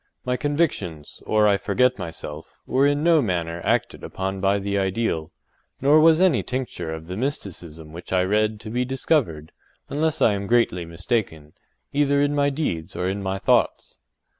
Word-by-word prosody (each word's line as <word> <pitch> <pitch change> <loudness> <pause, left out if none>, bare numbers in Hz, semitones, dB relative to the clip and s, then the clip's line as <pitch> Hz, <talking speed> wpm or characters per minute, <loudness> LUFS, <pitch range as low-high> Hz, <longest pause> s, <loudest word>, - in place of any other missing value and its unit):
My 125 0 0
convictions, 130 - -2
or 105 -1 +4
I 100 -1 +4
forget 125 +5 +1
myself, 80 -3 -8
were 135 +2 +3
in 145 +1 +1
no 165 -2 +5
manner 85 -6 -2
acted - - 0
upon 95 0 -4
by 100 +1 +3
the 100 0 -2
ideal, 95 -4 -1 0.5
nor 145 +3 +5
was 160 +1 +6
any 180 -9 +4
tincture 125 -10 -4
of 80 0 -6
the 90 +2 -6
mysticism 85 - -5
which 85 +1 -10
I 90 -1 +3
read 105 +2 +1
to 110 - -8
be 125 +2 0
discovered, 125 - -1 0.4
unless 155 +2 0
I 105 - +4
am 100 0 -3
greatly 115 -7 +2
mistaken, 85 -3 -3 0.4
either 140 0 +2
in 145 0 +2
my 145 0 +2
deeds 135 - -3
or 90 - -1
in 100 +2 -2
my 95 0 -2
thoughts. 95 - +1
100 Hz, 170 wpm, -23 LUFS, 85-135 Hz, 0.5 s, was